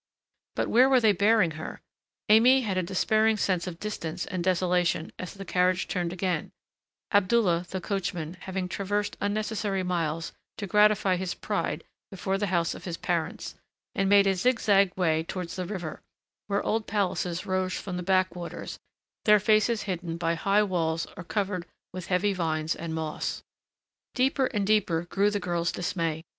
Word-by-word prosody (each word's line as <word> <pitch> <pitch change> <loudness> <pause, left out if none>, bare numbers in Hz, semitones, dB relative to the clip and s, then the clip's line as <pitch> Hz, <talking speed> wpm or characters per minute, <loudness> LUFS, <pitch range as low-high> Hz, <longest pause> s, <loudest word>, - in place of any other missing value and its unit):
But - - 0
where 255 +3 +5
were 260 -1 +5
they 220 -3 +5
bearing 200 -2 +3
her? - - -7 0.5
Aimée 245 +5 +6
had 200 -4 -1
a 185 - +2
despairing 215 +5 +2
sense 185 -3 0
of 170 -2 -6
distance 180 -5 -4
and 180 -2 -3
desolation 180 -2 +1
as 185 - -6
the 195 0 -8
carriage 185 0 +1
turned 175 -2 -2
again 180 -3 -2 0.6
Abdullah, 185 -4 +3
the 190 - -3
coachman, 175 -4 -3
having 190 0 -4
traversed 205 +2 -2
unnecessary 205 -1 -1
miles 165 -3 -2 0.3
to 205 - -4
gratify 210 -1 +4
his 185 0 -3
pride - - -2 0.3
before 195 0 -2
the 205 - 0
house 170 -3 +1
of - - -10
his 170 -2 -4
parents 170 0 -2 0.4
and 195 0 +1
made 200 0 +6
a 195 - +3
zigzag 200 -2 +3
way 160 -4 +2
towards 170 +1 -5
the 185 -2 -4
river, 175 -6 -5 0.5
where 200 0 0
old 220 -1 -1
palaces 185 -4 -1
rose 185 -1 -1
from 185 -2 -5
the - - -3
backwaters, 180 -2 -1 0.5
their 210 -1 +7
faces 215 +2 +2
hidden 175 -4 -4
by 165 -1 0
high 200 +5 +2
walls 165 -4 -1
or 185 - -7
covered 185 -1 -2 0.3
with 185 -1 -6
heavy 195 +2 +1
vines 160 -3 -1
and 165 -1 -5
moss. 160 -1 -3 0.7
Deeper 265 +1 +2
and 210 -6 -1
deeper 190 -6 +2
grew 200 +4 +1
the 205 0 -1
girl's 175 -2 -1
dismay. 165 -2 -2
185 Hz, 165 wpm, -27 LUFS, 175-205 Hz, 0.7 s, their